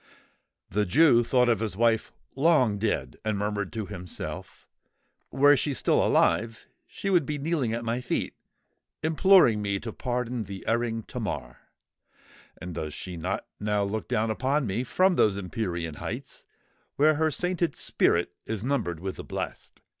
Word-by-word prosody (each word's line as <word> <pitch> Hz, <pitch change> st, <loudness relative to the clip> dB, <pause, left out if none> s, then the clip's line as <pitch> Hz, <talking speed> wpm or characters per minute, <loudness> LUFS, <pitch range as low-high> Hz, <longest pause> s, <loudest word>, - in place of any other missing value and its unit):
The 105 Hz, +2 st, 0 dB
Jew 120 Hz, -, +5 dB
thought 125 Hz, +1 st, +3 dB
of 115 Hz, -4 st, +2 dB
his 105 Hz, -4 st, -3 dB
wife 115 Hz, -1 st, +2 dB, 0.2 s
long 135 Hz, -8 st, +3 dB
dead, 110 Hz, +1 st, -1 dB
and 110 Hz, -1 st, -1 dB
murmured 105 Hz, -1 st, -2 dB
to 110 Hz, -2 st, -3 dB
himself—"Were 105 Hz, -, -2 dB
she 145 Hz, 0 st, -1 dB
alive 115 Hz, 0 st, +3 dB
still, -, -, -23 dB, 0.2 s
she 195 Hz, -, -4 dB
would 175 Hz, -4 st, +4 dB
be 150 Hz, +2 st, -3 dB
kneeling 145 Hz, -5 st, -1 dB
at 115 Hz, 0 st, -3 dB
my 115 Hz, +2 st, -1 dB
feet, -, -, -2 dB, 0.7 s
imploring 160 Hz, -, +5 dB
me 100 Hz, -1 st, -1 dB
to 115 Hz, -3 st, -6 dB
pardon 125 Hz, -2 st, -3 dB
the 95 Hz, -1 st, -8 dB
erring 115 Hz, -1 st, 0 dB
Tamar! -, -, -5 dB, 1.0 s
And 90 Hz, +1 st, -7 dB
does 75 Hz, -2 st, -5 dB
she 90 Hz, -1 st, -7 dB
not 80 Hz, -, -3 dB
now 105 Hz, -1 st, 0 dB
look 105 Hz, +2 st, -3 dB
down 115 Hz, -2 st, 0 dB
upon 135 Hz, +5 st, 0 dB
me 105 Hz, +4 st, -1 dB
from 185 Hz, +8 st, +2 dB
those 100 Hz, -2 st, +3 dB
empyrean 90 Hz, -4 st, -3 dB
heights -, -, -7 dB, 0.5 s
where 155 Hz, +2 st, +5 dB
her 160 Hz, +1 st, +1 dB
sainted 175 Hz, 0 st, -1 dB
spirit 85 Hz, +1 st, +1 dB, 0.2 s
is 110 Hz, -2 st, -3 dB
numbered 120 Hz, -, -1 dB
with 95 Hz, +2 st, -5 dB
the -, -, -6 dB
blest? -, -, -6 dB
115 Hz, 155 wpm, -27 LUFS, 100-140 Hz, 1.0 s, Jew